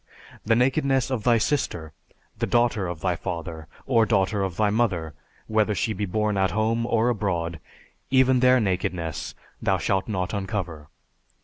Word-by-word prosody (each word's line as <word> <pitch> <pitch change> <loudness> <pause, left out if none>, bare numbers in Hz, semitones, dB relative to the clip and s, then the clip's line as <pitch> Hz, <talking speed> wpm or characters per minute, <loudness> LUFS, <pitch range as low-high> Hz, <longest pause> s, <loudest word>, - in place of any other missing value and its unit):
The 115 +1 +3
nakedness 135 +1 +2
of 120 -5 -1
thy 120 0 +4
sister, 90 - -1 0.5
the - - 0
daughter 120 -5 +2
of 85 -2 -6
thy 90 -2 0
father, 80 -2 -6 0.2
or 115 -4 +3
daughter 100 -1 +1
of 95 -3 -3
thy 105 -1 +2
mother, 95 -9 0 0.3
whether 110 -1 +1
she 110 - 0
be 105 -1 -3
born 105 +1 0
at 95 -1 +2
home, 110 +4 0
or 115 0 +2
abroad, 85 -8 -2 0.5
even 130 -1 +4
their 130 0 +5
nakedness 90 -6 -2 0.3
thou 95 -1 +2
shalt 95 +2 0
not 95 -3 -2
uncover. 90 -6 -4
105 Hz, 155 wpm, -25 LUFS, 90-115 Hz, 0.5 s, their